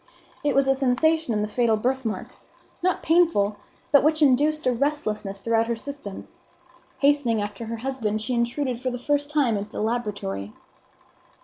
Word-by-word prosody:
It 290 -1 +1
was 275 0 +4
a 270 - +5
sensation 275 +3 +1
in 210 -1 0
the - - -1
fatal 225 0 +2
birthmark, 250 -1 -2 0.5
not 365 +1 0
painful, 320 - +3 0.3
but 285 - +6
which 310 +1 +3
induced 295 +3 +3
a 255 - +3
restlessness 215 -7 -2
throughout 225 +2 +1
her 235 - 0
system. 245 -4 -7 0.7
Hastening 280 -6 +3
after 205 +2 -4
her 230 0 -4
husband, 225 -4 -2
she 220 +4 -2
intruded 240 +1 -1
for 255 - -1
the 245 - -4
first 290 +3 0
time 280 -8 +2
into 205 +1 -5
the - - -6
laboratory. 205 - -3
245 Hz, 165 wpm, -24 LUFS, 215-285 Hz, 0.7 s, but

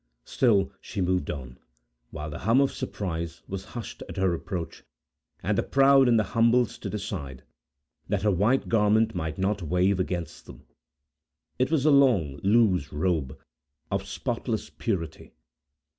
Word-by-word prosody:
Still 105 -7 +2
she 100 - -6
moved 90 -4 0
on, 65 -3 -6 0.5
while 75 0 -6
the - - -6
hum 115 +7 +3
of 140 -1 +3
surprise 85 -3 -5
was 95 0 -5
hushed 115 - -7
at - - -8
her 95 -2 +2
approach, 85 0 -5 0.6
and - - +1
the - - +2
proud 135 -1 +5
and 120 -1 +4
the 110 - +3
humble 115 +1 +4
stood 105 - -7
aside, 75 -11 -6 0.7
that 100 -1 0
her 105 - +3
white 105 +8 +2
garment 110 0 +3
might 80 -4 -4
not 100 +1 0
wave 90 +3 +1
against 90 -2 -4
them. - - -13 0.9
It 130 - +2
was 155 -3 +1
a 155 - +6
long, 115 - +4
loose 95 - +3
robe, 75 -4 -1 0.5
of 100 0 -2
spotless 115 +1 -3
purity. 90 -8 -4
95 Hz, 150 wpm, -26 LUFS, 85-115 Hz, 0.9 s, a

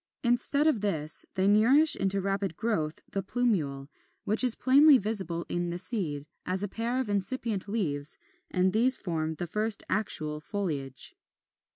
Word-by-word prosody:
Instead 245 +4 +2
of 300 -10 +2
this, 160 -7 -2
they 190 0 +1
nourish 250 +10 +5
into 195 0 0
rapid 195 -3 -2
growth 165 -9 -2
the 195 - -2
plumule, 185 - -1 0.4
which 215 +5 +2
is 250 -3 +3
plainly 280 +2 +6
visible 190 -6 -2
in 175 0 -2
the 170 - -4
seed, 165 -9 0 0.2
as 185 +2 -1
a - - -1
pair 230 +5 -2
of 260 - -2
incipient 205 0 -1
leaves; 150 -10 -2 0.3
and 185 0 +1
these 250 +4 +5
form 160 -3 -3
the 175 - -4
first 210 +4 +1
actual 155 -8 -1
foliage. 145 - -4
200 Hz, 155 wpm, -28 LUFS, 165-230 Hz, 0.4 s, plainly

